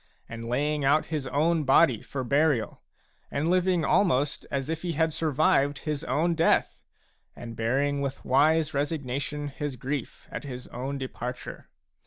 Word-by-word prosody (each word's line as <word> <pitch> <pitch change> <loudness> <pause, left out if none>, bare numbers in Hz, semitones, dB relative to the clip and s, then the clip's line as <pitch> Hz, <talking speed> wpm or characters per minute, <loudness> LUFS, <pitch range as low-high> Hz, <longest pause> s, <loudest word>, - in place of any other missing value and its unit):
214 - - -16
Digitized 115 0 -6 1.2
by 135 - +7
EPISTLE 120 -5 -5
XXX 130 -3 -3
burial, 140 -3 +1 0.5
and 155 +4 0
living 180 -3 +2
almost 145 -5 +2
as 135 -1 -2
if 160 0 -3
he 175 -2 -2
had 160 +1 +1
survived 145 -2 +2
his 150 0 -3
own 160 +6 +1
death, 165 0 +2 0.5
and 115 -1 -8
bearing 140 +5 0
with 140 -1 -4
wise 155 +4 +3
resignation 145 0 -2
his 145 0 -4
grief 135 +1 -5
at - - -5
his 125 -3 -7
own 135 +3 -4
departure. 125 -2 -6
140 Hz, 140 wpm, -27 LUFS, 130-155 Hz, 1.2 s, by